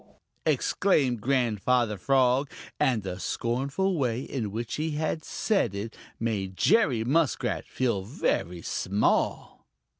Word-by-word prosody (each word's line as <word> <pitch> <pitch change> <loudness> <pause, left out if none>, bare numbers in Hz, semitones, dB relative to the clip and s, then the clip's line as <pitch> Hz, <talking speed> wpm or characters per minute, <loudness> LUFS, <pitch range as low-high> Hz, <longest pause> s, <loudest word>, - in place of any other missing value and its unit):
"Chugarum!" - - -28 0.3
exclaimed 135 - +2
Grandfather 120 -2 +1
Frog, 130 +5 +2 0.3
and 120 -6 +2
the 90 -1 -5
scornful 140 - -1
way 125 -2 0
in 120 -6 -3
which 115 +3 -4
he 155 0 -2 0.2
said 155 - 0
it 105 +3 -5 0.2
made 100 -5 -2
Jerry 130 - +3
Muskrat 145 +4 0
feel 120 -7 0
very 90 - -2
small. 100 +2 0
120 Hz, 115 wpm, -27 LUFS, 105-140 Hz, 0.3 s, Jerry